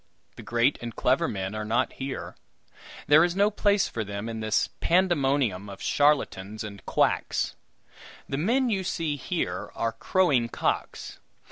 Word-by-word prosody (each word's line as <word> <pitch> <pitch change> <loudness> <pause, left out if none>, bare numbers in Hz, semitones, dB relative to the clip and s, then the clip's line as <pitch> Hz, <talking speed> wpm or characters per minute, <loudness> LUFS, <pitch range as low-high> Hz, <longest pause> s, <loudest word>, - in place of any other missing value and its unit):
The - - -10
great 120 +4 +1
and 120 -1 -6
clever 140 +7 +2
men 95 -1 -4
are 110 0 -3
not 115 +4 0
here; 135 0 -6 0.7
there 150 +2 +6
is 175 0 0
no 205 +2 +3
place 205 -1 +2
for 110 - -3
them 100 +1 -5
in 115 -1 -5
this 110 -1 +1
pandemonium 140 - +1
of 100 - -9
charlatans 110 -9 +1
and 100 -2 -8
quacks. - - +1 0.7
The 135 - -3
men 240 - +2
you 195 -3 0
see 165 -4 -2
here 165 +5 -3
are 115 - -1
crowing 130 -1 +1
cocks. - - -3
135 Hz, 150 wpm, -27 LUFS, 110-175 Hz, 0.7 s, there